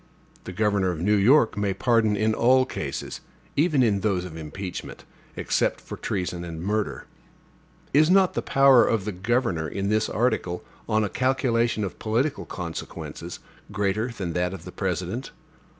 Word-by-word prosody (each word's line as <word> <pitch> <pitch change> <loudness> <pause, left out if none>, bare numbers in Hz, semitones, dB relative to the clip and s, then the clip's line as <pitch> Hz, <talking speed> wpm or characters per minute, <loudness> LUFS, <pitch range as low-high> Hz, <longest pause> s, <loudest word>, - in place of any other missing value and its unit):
The - - -6
governor 100 -1 +1
of 85 -3 -3
New 100 +5 +2
York 115 +5 +4
may 100 -2 -1
pardon 110 -1 +2
in 110 +1 +2
all 130 +3 +4
cases, - - -5 0.3
even 150 -3 +3
in 105 -4 +2
those 95 -3 0
of 85 -3 -8
impeachment, 85 +4 -7 0.3
except - - 0
for - - -8
treason 90 -2 -3
and 85 -2 -6
murder. 95 - -2 0.9
Is 155 +3 +5
not 190 0 +5
the - - -1
power 135 -2 +6
of 110 -4 0
the 105 - -2
governor, 100 -4 0
in 100 +6 -3
this 110 +1 +1
article, 105 -6 0 0.3
on 110 0 +2
a - - +1
calculation 120 -4 +1
of 95 - -5
political 125 +7 -1
consequences, 85 -3 -6 0.3
greater 105 +2 0
than 95 -8 -5
that 90 +2 -1
of 85 -2 -11
the 90 - -8
President? 95 +7 -3
105 Hz, 160 wpm, -25 LUFS, 90-120 Hz, 0.9 s, power